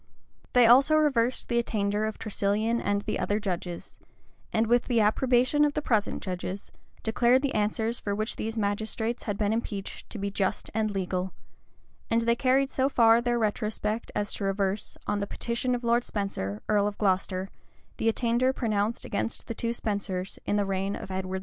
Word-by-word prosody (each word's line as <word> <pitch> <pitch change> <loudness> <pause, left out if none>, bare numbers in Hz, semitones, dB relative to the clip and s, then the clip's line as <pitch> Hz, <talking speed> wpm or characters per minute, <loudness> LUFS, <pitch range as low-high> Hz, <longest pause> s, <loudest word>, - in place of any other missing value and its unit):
They 245 -1 +7
also 270 +6 +6
reversed 260 -6 +2
the 235 -1 +2
attainder 210 -2 0
of 220 - -3
Tresilian 215 +2 0
and 205 0 0
the - - -2
other 205 +1 0
judges; 180 -4 -5 0.5
and, 220 +1 +2
with 240 +2 +3
the 240 -3 +2
approbation 250 +6 +3
of 295 -1 +2
the 300 - 0
present 220 -7 0
judges, 185 +1 -5 0.3
declared 240 +4 +3
the 280 - 0
answers 220 +2 0
for 200 -1 -2
which 215 +2 -2
these 225 +1 -4
magistrates 220 +3 -2
had 205 -2 -2
been 210 0 +1
impeached 210 -4 -4
to - - -7
be 200 0 -2
just 195 -1 -1
and 215 0 +1
legal:[] 185 -2 -2 0.8
and 230 0 +2
they 235 0 +3
carried 265 +2 +2
so 265 +1 +1
far 230 -3 +5
their 240 0 +1
retrospect 215 0 -1
as 205 0 -1
to - - -4
reverse, 195 +1 -1
on 205 0 0
the 200 - -2
petition 240 +3 -1
of 245 - -5
Lord 235 +1 +3
Spenser, 110 - -3
earl 205 -1 +3
of 205 - -4
Glocester, 190 -1 0 0.5
the 225 - +2
attainder 240 +3 +2
pronounced 220 -3 -1
against 230 - -3
the - - -4
two 230 +1 -2
Spensers 200 -5 -3
in 205 - +1
the 205 -1 +2
reign 195 +1 -1
of - - -7
Edward 190 0 -2
II. - - -4
215 Hz, 185 wpm, -28 LUFS, 200-235 Hz, 0.8 s, They